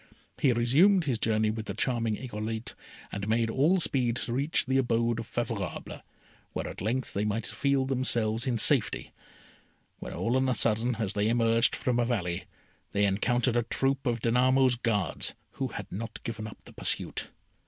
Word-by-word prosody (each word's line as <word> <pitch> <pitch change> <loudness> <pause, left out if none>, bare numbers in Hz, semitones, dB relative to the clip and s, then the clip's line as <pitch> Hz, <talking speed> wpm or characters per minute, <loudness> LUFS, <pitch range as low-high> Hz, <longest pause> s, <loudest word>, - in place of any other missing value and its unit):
He 135 - +4
resumed 150 - +4
his 130 -7 -1
journey 110 -1 +1
with 110 0 -6
the 100 - -4
charming 115 -2 0
Irolite, 110 -2 -5 0.4
and 100 0 -4
made 115 +1 +1
all 155 +10 +3
speed 130 -8 0
to 120 -1 -2
reach 140 +5 0
the 130 +1 +2
abode 115 -2 +1
of 115 - -6
Favourable, 115 -5 -4 0.5
where - - -3
at - - -7
length 120 +6 -2
they 100 - -1
might 105 +2 -1
feel 140 -1 0
themselves 125 -2 0
in 120 -2 +1
safety, - - +2 0.9
when - - -7
all 120 +2 -1
on 130 0 +1
a 125 - +1
sudden, 115 +3 +2
as 110 -4 -2
they 105 +1 +1
emerged 115 0 +4
from 125 -1 0
a 120 - +2
valley, 95 -8 -2 0.5
they 100 0 +3
encountered 120 +5 +1
a 120 - +3
troop 135 +3 0
of 120 -2 0
Danamo's 130 +2 +3
guards, 115 -4 0 0.2
who - - -3
had - - -6
not 110 +3 -6
given 110 -2 -5
up 105 - -10
the - - -13
pursuit. - - +1
115 Hz, 175 wpm, -28 LUFS, 110-130 Hz, 0.9 s, He